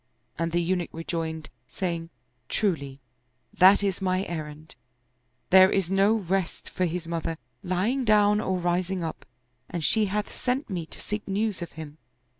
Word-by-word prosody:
And 165 0 0
the 175 - +2
Eunuch 180 0 0
rejoined, 160 -1 -4 0.2
saying, 165 +3 -3 0.2
" 125 0 -45
Truly, 140 -10 -1 0.5
that 190 +3 +6
is 195 -1 -1
my 185 0 +1
errand: 155 -2 -6 0.8
there 190 0 +8
is 190 -2 0
no 195 +2 +4
rest 190 -3 -2
for 185 - 0
his 170 0 -3
mother, 165 -1 -2 0.3
lying 195 +9 0
down 210 -2 +4
or 190 -3 0
rising 180 +1 0
up, 160 - -6 0.4
and 170 -2 -3
she 215 +6 +3
hath 205 +1 -2
sent 255 -1 -2
me 170 -4 -3
to - - -9
seek 210 0 -4
news 205 0 -1
of 175 - -6
him." 155 -1 -9
180 Hz, 160 wpm, -26 LUFS, 165-195 Hz, 0.8 s, there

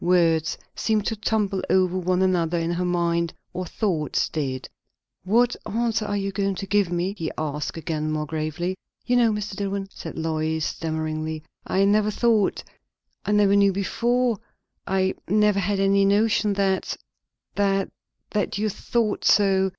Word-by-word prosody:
Words 165 -3 +3 0.2
seemed 215 -2 0
to 225 - -1
tumble 210 -3 0
over 185 -1 +3
one 185 0 +1
another 175 -2 +1
in 165 0 -1
her 175 +1 -1
mind, 170 -1 0 0.2
or 180 0 -4
thoughts 165 -6 -1
did. 130 -4 -3 0.6
"What 235 +5 +3
answer 225 0 -1
are 205 - -1
you 195 0 -2
going 195 0 -1
to 195 - -5
give 200 -2 +1
me?" 175 +3 -1
he 165 -5 -3
asked 150 0 -3
again, 155 -1 -2
more 155 0 -1
gravely. 155 +4 -3 0.3
"You 245 - +2
know, 235 -2 +4
Mr. 210 -1 -3
Dillwyn," 195 -1 -3
said - - -8
Lois 160 -1 -1
stammeringly, 155 -1 -3 0.2
"I 195 +1 +2
never 210 +1 +3
thought, 220 -2 +2 0.6
I - - +1
never 205 -1 +4
knew 200 -1 +5
before, 235 +4 0 0.5
I 190 0 +1
never 210 0 +3
had 200 +1 0
any 195 0 +4
notion, 205 +1 +3
that 195 -1 0 0.6
that 195 -1 +1 0.4
that 205 -1 -1
you 215 +1 0
thought 220 +1 -1
so." 195 -1 +4
195 Hz, 155 wpm, -24 LUFS, 170-205 Hz, 0.6 s, knew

